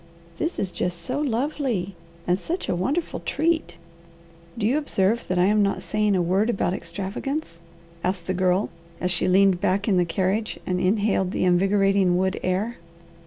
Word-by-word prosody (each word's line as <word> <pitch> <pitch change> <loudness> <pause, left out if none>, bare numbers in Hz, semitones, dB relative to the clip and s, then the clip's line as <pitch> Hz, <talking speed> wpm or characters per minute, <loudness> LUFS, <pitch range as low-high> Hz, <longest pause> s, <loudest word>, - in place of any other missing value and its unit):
"This 330 +2 -1
is 190 - -1
just 175 -1 -3
so 255 +8 -2
lovely, 250 -7 -1 0.3
and 180 +1 +1
such 350 - -4
a - - 0
wonderful 280 - -1
treat, 320 - -1 0.8
do 220 - -1
you 240 +6 +3
observe 230 -5 0
that 185 - -1
I'm 205 +4 +4
not 200 -2 0
saying 210 +3 +1
a 180 - +2
word 190 +6 +2
about 195 -5 0
extravagance?" 190 - -4 0.4
asked 180 -2 -1
the 185 - -1
Girl, 185 +2 +1 0.3
as 180 - -1
she 180 0 0
leaned 190 -1 +4
back 200 +3 +1
in 195 -4 +3
the 175 - +3
carriage 195 +5 -1
and 180 0 -1
inhaled 195 0 +1
the - - -1
invigorating 195 0 +3
wood 190 0 0
air. 195 +6 -1
195 Hz, 165 wpm, -24 LUFS, 180-220 Hz, 0.8 s, I'm